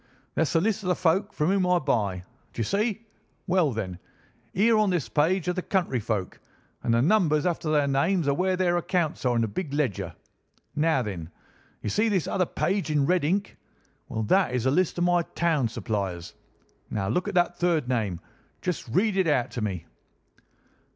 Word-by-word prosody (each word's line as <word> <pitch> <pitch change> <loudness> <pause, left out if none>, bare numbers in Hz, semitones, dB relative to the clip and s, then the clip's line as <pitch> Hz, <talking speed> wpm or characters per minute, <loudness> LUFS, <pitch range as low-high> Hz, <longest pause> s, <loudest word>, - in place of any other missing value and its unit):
"That's 160 -4 +1
the 165 - +4
list 215 +2 0
of 185 - -3
the 180 - +3
folk 190 +4 +1
from 150 +2 0
whom 190 -1 +2
I 180 0 +4
buy. 105 - 0 0.3
D'you 115 - -2
see? 215 - -1 0.4
Well, 175 -5 +2
then, 95 -6 -4 0.5
here 220 +4 +3
on 210 -2 +3
this 170 -10 0
page 160 - +1
are 180 - +2
the 185 - -2
country 175 -10 0
folk, 105 -4 -3 0.4
and - - 0
the 120 - +3
numbers 160 -4 +3
after 170 -3 -1
their 150 -2 +3
names 155 +5 +1
are 140 - +3
where 185 +5 +1
their 175 -1 +2
accounts 170 -4 -1
are 125 -1 +2
in 115 - +2
the - - 0
big 155 - -4
ledger. 140 -10 -1 0.6
Now, 155 -3 +2
then! 90 -7 -5 0.5
You - - -1
see 220 +2 +2
this 190 -6 +1
other 180 -3 0
page 190 -3 -1
in 150 -2 +2
red 180 +1 +2
ink? 195 +6 -1 0.5
Well, 110 - -2
that 160 - +2
is 125 -1 -1
a 130 - +3
list 180 +4 +1
of 175 - +1
my 175 0 +3
town 165 -6 0
suppliers. 100 -7 -4 0.6
Now, 95 -3 -2
look 180 - 0
at - - -3
that 175 0 +2
third 170 -6 +1
name. 110 -9 -1 0.4
Just 180 -7 -2
read 195 - +1
it 190 -3 +3
out 130 -6 +1
to 120 - -4
me." 95 -6 -3
160 Hz, 195 wpm, -26 LUFS, 120-185 Hz, 0.6 s, the